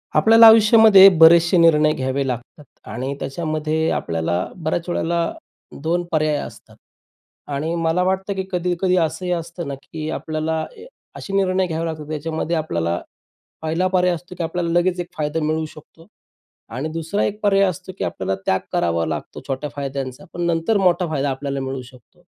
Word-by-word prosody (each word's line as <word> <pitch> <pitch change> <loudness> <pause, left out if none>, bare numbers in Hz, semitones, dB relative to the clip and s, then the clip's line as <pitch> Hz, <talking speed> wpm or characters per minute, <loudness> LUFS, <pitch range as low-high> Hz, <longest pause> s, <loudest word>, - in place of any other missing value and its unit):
आपल्याला 225 +1 +7
आयुष्यामध्ये 220 -3 +8
बरेचसे 170 +2 +6
निर्णय 155 -2 +5
घ्यावे 135 0 -2
लागतात 125 +4 -6 0.3
आणि 130 +5 -4
त्याच्यामध्ये 155 +2 -2
आपल्याला 85 +2 -1
बऱ्याच 170 0 -3
वेळेला 170 -1 -1 0.5
2 170 +3 0
पर्याय 155 -1 +1
असतात - - -9 0.8
आणि 150 +4 -2
मला 165 +2 +1
वाटतं 190 +2 -1
की 190 -1 -3
कधी-कधी 180 +1 0
असंही 180 +2 -1
असतं 170 -1 -4
ना, 140 - -4
की 155 -1 -6
आपल्याला 160 0 -3 0.5
असे 195 - -8
निर्णय 190 -1 +1
घ्यावे 165 0 -3
लागतात. 155 -2 -5
त्याच्यामध्ये 160 +2 -3
आपल्याला 85 - -1 0.6
पहिला 165 +4 0
पर्याय 180 -1 +2
असतो 180 +2 -11
की 175 - -2
आपल्याला 170 +1 -2
लगेच 180 0 0
एक 175 - -3
फायदा 150 +1 -1
मिळू 155 +1 -1
शकतो 155 +2 -15 0.7
आणि 140 +5 -3
दुसरा 165 +5 -2
एक 210 +1 -2
पर्याय 200 -1 +4
असतो, 185 0 -2
की - - -3
आपल्याला 95 0 -2
त्याग 95 - +2
करावा 85 -1 0
लागतो 80 -2 -5
छोट्या 135 +2 -3
फायद्यांचा, 135 +2 -5
पण 175 - -5
नंतर 170 +6 +1
मोठा 180 -2 +2
फायदा 145 -3 -1
आपल्याला 140 +1 -3
मिळू 135 0 -4
शकतो. 125 -2 -18
160 Hz, 160 wpm, -20 LUFS, 145-180 Hz, 0.8 s, आयुष्यामध्ये